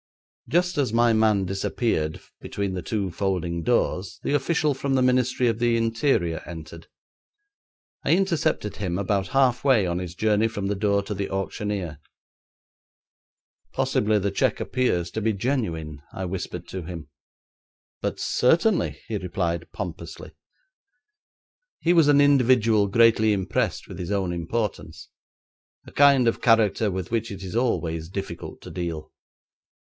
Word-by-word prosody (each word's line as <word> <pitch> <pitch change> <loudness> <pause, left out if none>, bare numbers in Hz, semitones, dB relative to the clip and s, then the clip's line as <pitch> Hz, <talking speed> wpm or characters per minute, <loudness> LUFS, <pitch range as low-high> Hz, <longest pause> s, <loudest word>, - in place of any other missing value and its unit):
Just 175 -1 +1
as 135 -6 +1
my 120 0 +3
man 110 -3 +3
disappeared 95 -4 -1 0.2
between 100 -2 -3
the 90 - -3
two 100 +1 -2
folding 90 -3 -2
doors 95 -4 0
the - - -1
official 150 +1 +1
from 135 0 -1
the 130 - +3
Ministry 125 0 +2
of 115 -1 0
the 120 -1 +2
Interior 115 - 0
entered. 80 -1 -9 1.2
I - - +3
intercepted 170 - 0
him 90 -4 -2
about 100 -1 0
half 130 -1 +2
way 130 -8 +4
on 85 0 -1
his 90 -1 -6
journey 110 +2 +2
from 105 -3 -4
the 100 +1 0
door 100 0 +1
to 105 - -4
the 100 0 -3
auctioneer. 95 -4 -3 1.7
'Possibly 105 0 +1
the 100 0 0
cheque - - +1
appears 90 -10 0
to 110 - -3
be 110 +1 +1
genuine,' 90 - -2
I 95 - -5
whispered 90 -1 -5
to 95 - -5
him. 85 -3 -8 0.9
'But - - -3
certainly,' 170 - +2
he 110 - -2
replied 85 -3 -3
pompously. - - -7 1.5
He 170 - +2
was 165 -4 +5
an 145 -1 +5
individual 125 -7 +4
greatly 110 0 +4
impressed 95 -2 -1
with - - -9
his 90 - -5
own 95 -3 -1
importance; 95 +6 -4 0.8
a - - -12
kind 140 -3 +5
of 115 - 0
character 110 -2 +3
with 95 0 -4
which 115 -1 -1
it 100 -3 -7
is 95 +3 -6
always 85 -10 -1
difficult 95 -3 -6
to - - -10
deal. 85 -4 -5
105 Hz, 145 wpm, -24 LUFS, 90-120 Hz, 1.7 s, was